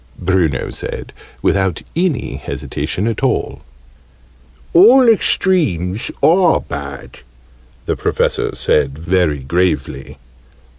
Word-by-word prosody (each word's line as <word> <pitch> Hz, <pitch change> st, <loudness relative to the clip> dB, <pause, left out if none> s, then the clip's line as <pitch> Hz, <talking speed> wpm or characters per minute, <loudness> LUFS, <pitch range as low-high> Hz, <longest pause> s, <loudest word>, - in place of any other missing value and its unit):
Bruno 90 Hz, -6 st, 0 dB
said, -, -, -7 dB, 0.3 s
without 95 Hz, -4 st, 0 dB
any 170 Hz, -6 st, -1 dB
hesitation 95 Hz, -, -4 dB
at 115 Hz, -2 st, -2 dB
all. -, -, -1 dB, 1.1 s
"All 235 Hz, +9 st, +7 dB
extremes 135 Hz, -, +1 dB
are 175 Hz, 0 st, +4 dB
bad," 70 Hz, -1 st, -8 dB, 0.7 s
the -, -, -1 dB
Professor -, -, -1 dB
said, 70 Hz, -2 st, +1 dB
very 80 Hz, -4 st, 0 dB
gravely. 75 Hz, -3 st, -2 dB
95 Hz, 90 wpm, -17 LUFS, -, 1.1 s, All